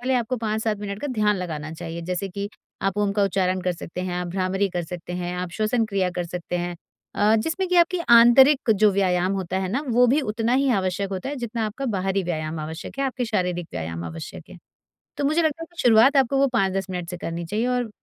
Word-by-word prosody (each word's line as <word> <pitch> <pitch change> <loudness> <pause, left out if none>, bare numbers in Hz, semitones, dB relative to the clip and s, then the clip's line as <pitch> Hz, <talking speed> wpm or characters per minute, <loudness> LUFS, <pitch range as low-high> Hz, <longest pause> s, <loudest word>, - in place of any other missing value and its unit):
पहले 255 +2 0
आपको 250 +1 0
5-7 220 -1 -1
मिनट 205 0 -5
का 290 - -3
ध्यान 210 -3 +2
लगाना 155 -4 -5
चाहिए। 165 +1 -6
जैसे 180 +3 -3
कि 200 +2 -5 0.3
आप 195 +1 0
ओम 205 -1 +1
का 205 0 +1
उच्चारण 185 -1 0
कर 180 0 0
सकते 170 +1 -7
हैं, 180 -1 -3
आप 180 - -3
भ्रामरी 190 +2 0
कर 175 -1 -2
सकते 175 +1 -7
हैं, 180 0 -3
आप 180 -1 -4
श्वसन 225 +3 +1
क्रिया 195 -3 0
कर 175 -1 -3
सकते 180 +1 -4
हैं 175 0 -3 0.4
अ, 210 +2 +3
जिसमें 330 - -1
कि 360 - +2
आपकी 345 +1 +4
आंतरिक 240 +3 +7
जो 210 0 +5
व्यायाम 185 -1 +1
होता 190 -1 -2
है 190 -1 -2
ना। 255 +9 -1
वो 245 +1 +4
भी 280 +6 +3
उतना 225 -1 -1
ही 275 +1 +2
आवश्यक 195 0 -1
होता 190 +7 -4
है 290 - -4
जितना 235 -2 -3
आपका 255 +6 -5
बाहरी 190 +1 0
व्यायाम 155 -2 -3
आवश्यक 160 - -7
है, 275 - +1
आपके 255 -1 -2
शारीरिक 180 -6 -1
व्यायाम 80 +1 -4
आवश्यक 80 -1 -8
है। - - -10 0.6
तो 285 - -2
मुझे 310 +4 +2
लगता 315 0 0
है - - -7
कि 345 - -5
शुरुआत 245 +4 +6
आपको 270 +1 +3
वो 275 0 +4
5-10 195 -3 0
मिनट 180 -2 -4
से 180 - -5
करनी 170 0 -4
चाहिए 215 +7 -1
और 245 -2 0
200 Hz, 235 wpm, -24 LUFS, 180-240 Hz, 0.6 s, आंतरिक